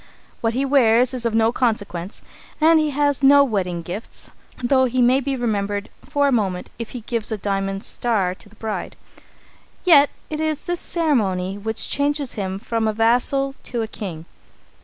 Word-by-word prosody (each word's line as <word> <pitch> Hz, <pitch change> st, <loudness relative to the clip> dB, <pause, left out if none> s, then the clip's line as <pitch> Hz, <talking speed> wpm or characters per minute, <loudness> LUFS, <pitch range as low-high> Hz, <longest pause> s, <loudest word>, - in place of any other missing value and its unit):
What 225 Hz, 0 st, 0 dB
he 270 Hz, +2 st, +1 dB
wears 250 Hz, -2 st, +4 dB
is 245 Hz, -2 st, -1 dB
of 225 Hz, -, -2 dB
no 225 Hz, 0 st, +3 dB
consequence, 205 Hz, -7 st, -2 dB, 0.4 s
and 320 Hz, +1 st, +5 dB
he 310 Hz, -1 st, +1 dB
has 285 Hz, 0 st, +1 dB
no 280 Hz, +1 st, +7 dB
wedding 185 Hz, -9 st, -2 dB
gifts, 180 Hz, +7 st, -7 dB, 0.3 s
though 260 Hz, +1 st, +4 dB
he 255 Hz, 0 st, -1 dB
may 250 Hz, +2 st, +5 dB
be 275 Hz, 0 st, -2 dB
remembered 205 Hz, -4 st, -2 dB, 0.2 s
for 285 Hz, -1 st, +2 dB
a -, -, +2 dB
moment 195 Hz, -7 st, -1 dB
if 230 Hz, -, -5 dB
he -, -, -7 dB
gives 230 Hz, 0 st, -2 dB
a 220 Hz, -, -1 dB
diamond 195 Hz, 0 st, -2 dB
star 205 Hz, -7 st, +1 dB
to 195 Hz, -, -16 dB
the 215 Hz, -, -20 dB
bride. 220 Hz, -1 st, -5 dB, 0.9 s
Yet 295 Hz, -6 st, +6 dB, 0.2 s
it 305 Hz, 0 st, -2 dB
is 310 Hz, -2 st, -1 dB
this 350 Hz, 0 st, -3 dB
ceremony 200 Hz, -, 0 dB
which 220 Hz, +2 st, -3 dB
changes 285 Hz, -1 st, -1 dB
him 190 Hz, -2 st, -3 dB
from 225 Hz, +2 st, -2 dB
a 215 Hz, -, 0 dB
vassal 245 Hz, +5 st, +2 dB
to 235 Hz, -2 st, -2 dB
a -, -, -4 dB
king. 175 Hz, -7 st, -7 dB
230 Hz, 180 wpm, -21 LUFS, 205-275 Hz, 0.9 s, no